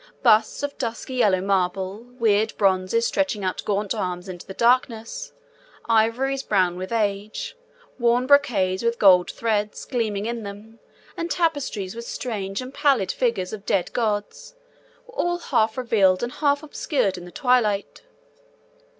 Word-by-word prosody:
Busts 220 +1 +4
of 285 0 -4
dusky 235 +1 -4
yellow 205 -7 +3
marble, 190 0 0 0.2
weird 220 -2 +2
bronzes 195 +3 +2
stretching 245 -9 0
out 185 - -2
gaunt 205 0 0
arms 180 -3 -3
into 180 -2 -8
the 190 - -8
darkness, 235 -2 +1 0.5
ivories 230 +5 +2
brown 185 -7 +1
with 185 +3 -6
age, 215 - -2 0.4
worn 240 +1 +3
brocades 220 -10 +3
with 235 0 0
gold 185 -3 +6
threads 210 -2 -2
gleaming 215 -5 -2
in 235 0 -3
them, 210 +2 -10 0.4
and 335 0 -3
tapestries 285 - -1
with 235 0 -7
strange 205 -5 -4
and 255 +1 -8
pallid 270 -12 +2
figures 225 -7 -1
of 205 -2 -7
dead 195 -3 0
gods, 215 - -2 0.5
were 475 - -16
all 350 -7 0
half 220 -9 0
revealed 215 -6 +2
and 240 - -2
half 285 +2 +1
obscured 280 - -1
in 175 -1 -9
the 175 - -11
twilight. 220 -5 +1
220 Hz, 145 wpm, -23 LUFS, 195-250 Hz, 0.5 s, gold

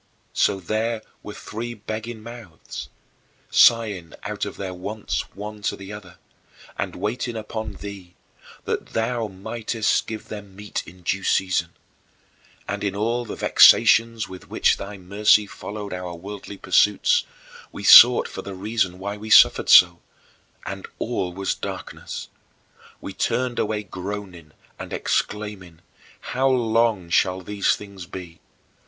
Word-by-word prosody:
So 95 - +2
there 110 +4 -2 0.2
were 105 - -9
three 120 +2 -6
begging 110 +1 -6
mouths, 115 -8 -9 0.6
sighing 105 -8 +4
out - - -6
their 95 -2 -4
wants 100 +4 -3
one 105 +1 -7
to - - -1
the 100 +1 -9
other, 95 -3 -11 0.6
and - - -4
waiting 115 +2 -3
upon 110 -1 -5
thee, 95 -3 -10 0.5
that - - -3
thou 115 0 -1
mightest 110 +3 -2
give 110 -1 -7
them 105 -2 -7
their 95 - -20
meat 105 +1 -4
in 90 +1 -14
due 95 +3 -1
season. 95 -3 0 0.9
And - - -3
in 100 -1 -1
all 115 +4 -1
the - - -6
vexations 115 -1 +5
with 95 -1 -11
which - - +2
thy 100 +1 -7
mercy 105 +3 +3
followed 100 0 -7
our 90 -1 -5
worldly 100 +3 -9
pursuits, 95 +2 +3 0.5
we 100 - -8
sought 120 +4 +9
for - - -7
the 100 0 -8
reason 95 -2 -1
why 100 +2 -5
we 110 +1 -8
suffered - - +6
so 85 -1 +8 0.7
and - - -6
all 90 -1 -2
was 95 +2 -2
darkness! - - -7 0.7
We - - -7
turned 125 -1 -1
away 105 0 -1
groaning 90 -5 -7 0.3
and - - -7
exclaiming, 105 -6 -3 0.4
"How 130 +2 0
long 115 -7 +1
shall 95 +2 +2
these 100 +2 +1
things 100 -4 -10
be?" 85 -3 -9
105 Hz, 135 wpm, -23 LUFS, 95-110 Hz, 0.9 s, sought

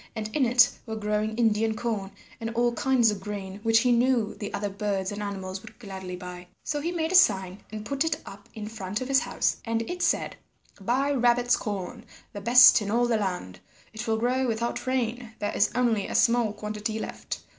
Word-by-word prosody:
And 215 0 -5
in 275 -5 +3
it 245 +1 +6 0.2
were 220 - -4
growing 215 0 -1
Indian 220 -1 +2
corn 215 -4 -3 0.3
and 225 -1 -3
all 240 0 +2
kinds 245 -2 +3
of 205 - -5
grain 195 -1 -6
which 225 0 +4
he 250 0 +3
knew 240 -2 +2
the 205 - -6
other 205 0 -2
birds 200 -1 -2
and 205 0 -5
animals 190 -2 -5
would - - -14
gladly 190 -5 -7
buy. 180 0 -9 0.2
So 295 -1 -2
he 335 +3 -2
made 330 -1 -1
a - - +1
sign 190 - +4
and 215 -1 -6
put 280 +4 0
it 320 -1 0
up 200 +1 -12
in 215 -1 -6
front 210 -1 -4
of 255 - -3
his 270 0 +4
house, - - -1
and 230 0 -2
it 355 0 -5
said, - - 0 0.4
"Buy 255 +8 0
Rabbit's 245 -2 +3
corn, 210 +2 -5 0.3
the 205 - -6
best 245 +2 +8
in 205 - -4
all 235 +3 +2
the 240 -1 +1
land; 180 - -4 0.3
it 220 +2 -6
will 220 0 +1
grow 250 +3 +1
without 235 +2 -2
rain; 245 -2 -2
there 205 0 -3
is - - +3
only 230 -5 +1
a - - -5
small 235 -2 +3
quantity 210 +1 -4
left. - - -6
220 Hz, 210 wpm, -26 LUFS, 205-245 Hz, 0.4 s, best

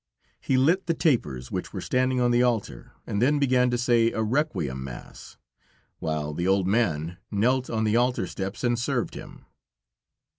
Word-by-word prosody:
He 130 - 0
lit 170 +9 +2
the 165 - +1
tapers, 75 - 0
which - - -4
were - - -4
standing 130 0 0
on 120 -1 +2
the 120 0 +3
altar, 115 - -1
and 100 - -2
then 145 +4 +3
began 130 -3 +3
to 120 - 0
say 120 -1 +3
a 110 - -1
Requiem 105 - -1
Mass; 65 -2 -10 0.6
while 75 -1 -2
the 85 +4 -2
old 95 -1 +3
man 90 -6 0
knelt 125 +5 +1
on 110 -1 -1
the 110 +1 +2
altar 125 +1 +1
steps 95 +4 -5
and 120 -1 +1
served 125 -1 -1
him. - - -11
120 Hz, 175 wpm, -26 LUFS, 95-130 Hz, 0.6 s, the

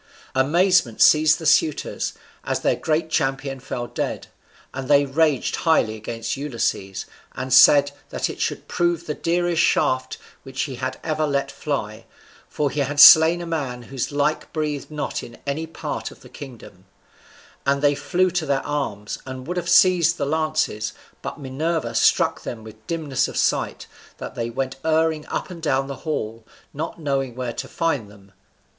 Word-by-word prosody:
Amazement 165 - +3
seized 155 +1 +6
the 160 - -8
suitors, 155 0 +1 0.3
as - - -2
their - - +2
great 160 +1 -1
champion 135 -2 -1
fell 125 -1 -5
dead, - - -4 0.5
and 135 -1 -5
they 145 0 +5
raged 145 0 +1
highly 160 -10 +2
against 115 +1 -4
Ulysses, 115 -8 -3 0.3
and 130 -1 -3
said 140 +2 +7 0.2
that - - -2
it - - -7
should - - -2
prove 175 -1 0
the 150 - -2
dearest 170 +1 0
shaft 130 0 +1 0.2
which 135 -1 -4
he 130 -5 -6 0.2
ever 155 -1 0
let 140 -1 -1
fly, 110 -8 -4 0.4
for 145 -2 -1
he 150 - -3
had 145 +1 -1
slain 160 +4 +9
a - - -5
man 135 -7 -3
whose 130 +3 -4
like 145 +2 -1
breathed 150 -3 -3
not 150 -1 -3
in 120 - -11
any 150 +3 -2
part 165 - -5
of - - -16
the - - -14
kingdom; 115 -9 -12 0.8
and 140 +1 +1
they 145 0 +5
flew 185 +5 0
to 170 -2 -1
their 140 -1 0
arms, 120 -9 -3
and 130 -1 -7
would 180 +4 -4
have 175 0 -2
seized 175 -1 +5
the - - -1
lances, 155 -8 -1 0.3
but - - -6
Minerva 155 +4 -2
struck - - +3
them 110 -2 -7
with 110 0 -14
dimness 155 -6 -1
of - - -7
sight - - 0 0.3
that - - -7
they 115 0 -3
went 130 +2 -3
erring 160 -1 +1
up - - -4
and 170 -2 -9
down 135 -3 +1
the 140 0 -6
hall, 115 -7 -3 0.3
not 160 +4 -5
knowing 135 -5 -2
where 125 -2 -4
to - - -5
find 145 -11 -1
them. 100 -1 -18
145 Hz, 170 wpm, -22 LUFS, 130-160 Hz, 0.8 s, slain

